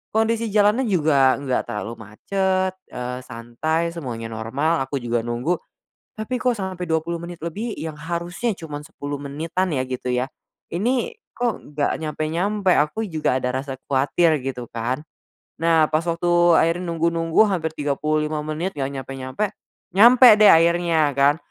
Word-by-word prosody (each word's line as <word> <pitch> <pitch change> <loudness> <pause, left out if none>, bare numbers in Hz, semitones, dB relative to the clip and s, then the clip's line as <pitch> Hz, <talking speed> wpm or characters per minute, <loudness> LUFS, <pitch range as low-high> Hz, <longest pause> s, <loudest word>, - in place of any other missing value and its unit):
Kondisi 225 +1 +1
jalannya 210 +4 +3
juga 150 -8 +3
gak 135 -3 -1
terlalu 105 +2 -4
macet, 185 - -1 0.2
eee, 125 0 -4
santai 130 +8 -2
semuanya 120 -8 -5
normal 130 +9 -1
aku 135 - -5
juga 120 -1 -1
nunggu. 120 +9 -1 0.6
Tapi 220 +4 -3
kok 250 -2 +1
sampai 190 -3 -4
20 160 +1 0
menit 170 0 -7
lebih 210 +8 -4
yang 160 -1 -6
harusnya 175 +8 -2
cuma 150 -4 -7
10 145 -2 -6
menitan 160 +6 -2
ya 130 - 0
gitu 130 -1 -5
ya, 125 +1 +1 0.5
ini 240 - 0 0.2
kok 240 -1 -1 0.2
gak 145 +1 0
nyampe-nyampe, 175 +6 0
aku 155 +10 +1
juga 155 -6 0
ada 125 0 -1
rasa 135 -1 -6
kuatir 145 +3 +2
gitu 125 -2 -4
kan. 125 +5 -3 0.6
Nah 165 -1 +4
pas 155 0 +1
waktu 170 0 -1 0.3
akhirnya 170 +3 +1
nunggu-nunggu 165 +3 +2
hampir 160 -4 -1
35 150 +1 -1
menit 160 +5 -3
gak 135 -1 -1
nyampe-nyampe, 135 - -4 0.4
nyampe 240 +6 +8
deh 210 -1 +7
akhirnya 165 -2 +4
kan. 140 +3 +3
160 Hz, 145 wpm, -22 LUFS, 135-180 Hz, 0.6 s, nyampe